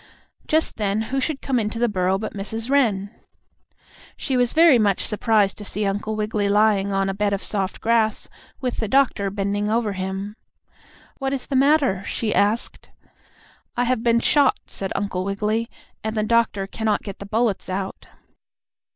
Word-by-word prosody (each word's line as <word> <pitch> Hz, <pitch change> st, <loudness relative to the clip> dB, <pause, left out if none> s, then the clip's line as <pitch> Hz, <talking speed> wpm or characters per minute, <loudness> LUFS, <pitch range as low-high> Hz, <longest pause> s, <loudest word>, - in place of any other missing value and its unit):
Just 315 Hz, +1 st, +1 dB
then, 210 Hz, 0 st, 0 dB
who 270 Hz, -, +2 dB
should 285 Hz, 0 st, -3 dB
come 260 Hz, -3 st, +1 dB
into 215 Hz, +1 st, -2 dB
the 240 Hz, +1 st, +2 dB
burrow 190 Hz, -2 st, +1 dB
but 215 Hz, +2 st, -5 dB
Mrs. 225 Hz, +5 st, -5 dB
Wren. 210 Hz, -8 st, +2 dB, 1.1 s
She 265 Hz, -, -1 dB
was 245 Hz, -1 st, +2 dB
very 320 Hz, -6 st, +6 dB
much 200 Hz, -3 st, +1 dB
surprised 210 Hz, -2 st, +1 dB
to -, -, -7 dB
see 205 Hz, +1 st, -3 dB
Uncle 205 Hz, +2 st, -2 dB
Wiggily 210 Hz, -1 st, -1 dB
lying 205 Hz, -1 st, +3 dB
on 195 Hz, 0 st, +1 dB
a 195 Hz, -, -1 dB
bed 200 Hz, +1 st, 0 dB
of 200 Hz, -, -2 dB
soft 195 Hz, -3 st, -2 dB
grass, 225 Hz, -1 st, +1 dB, 0.3 s
with 250 Hz, -3 st, -3 dB
the 220 Hz, -, -1 dB
doctor 230 Hz, -5 st, +2 dB
bending 205 Hz, +1 st, -1 dB
over 220 Hz, -2 st, 0 dB
him. 190 Hz, +2 st, -4 dB, 0.8 s
"What 270 Hz, -1 st, -1 dB
is 270 Hz, -, -3 dB
the 275 Hz, -, -3 dB
matter?" 270 Hz, -8 st, +3 dB
she 215 Hz, 0 st, -2 dB
asked. 210 Hz, +3 st, 0 dB, 0.9 s
"I 245 Hz, -, +2 dB
have 250 Hz, -1 st, +1 dB
been 235 Hz, -1 st, +3 dB
shot," 285 Hz, 0 st, +4 dB
said 195 Hz, -1 st, -6 dB
Uncle 195 Hz, -2 st, -2 dB
Wiggily, 210 Hz, +4 st, -1 dB, 0.3 s
"and 220 Hz, 0 st, -3 dB
the 215 Hz, -, +2 dB
doctor 220 Hz, -3 st, +1 dB
cannot 215 Hz, +1 st, -1 dB
get 200 Hz, -2 st, -7 dB
the 200 Hz, -, -8 dB
bullets 220 Hz, -2 st, 0 dB
out." 190 Hz, +1 st, -4 dB
215 Hz, 170 wpm, -22 LUFS, 200-235 Hz, 1.1 s, very